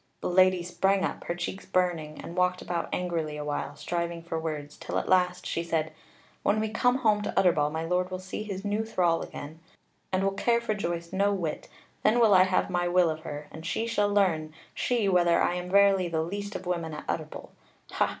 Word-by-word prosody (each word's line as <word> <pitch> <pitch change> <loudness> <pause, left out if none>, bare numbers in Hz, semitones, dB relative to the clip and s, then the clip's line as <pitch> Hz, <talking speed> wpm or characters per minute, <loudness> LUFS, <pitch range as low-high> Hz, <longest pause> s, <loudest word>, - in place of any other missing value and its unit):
The - - -1
Lady 185 -1 +4
sprang 190 +3 +1
up, - - -5
her 170 - -2
cheeks 175 +2 -4
burning, 170 -4 0
and 170 - -8
walked 180 0 +1
about 170 -1 -2
angrily 165 -4 -2
a 150 - -5
while, 145 -1 -3
striving 170 +1 -3
for 165 -1 -3
words, 150 -2 -5
till - - -4
at - - -2
last 180 -1 +2
she 165 - -1
said: 165 -2 -1 0.5
"When 210 +2 +2
we 220 0 -1
come 245 +3 +2
home 210 -1 +4
to 205 - 0
Utterbol, 160 -6 +3
my 160 +1 -3
lord 180 +2 0
will 185 - -4
see 185 +2 -6
his 200 -2 -5
new 205 +2 0
thrall 180 -6 +1
again, 155 +3 -8 0.5
and 190 0 +1
will 195 - +2
care 235 +4 +2
for 235 -2 -1
Joyce 170 -3 -4
no 200 +2 +2
whit: 170 -6 -3 0.3
then 220 +3 +3
will 225 -3 +6
I 185 -1 +7
have 185 -1 +1
my 175 -1 +1
will 175 -1 +3
of 155 - -5
her; 150 -1 -7
and 160 - -9
she 200 +6 -1
shall 210 -3 +1
learn, 160 -6 +1 0.2
she, 235 -5 0
whether 175 -2 +4
I - - +2
am 180 0 -4
verily 195 -1 +5
the 160 -2 -1
least 200 +4 -5
of 185 - -5
women 170 -3 -2
at - - -8
Utterbol! - - -4 0.4
Ha! - - +1
180 Hz, 220 wpm, -28 LUFS, 165-195 Hz, 0.5 s, I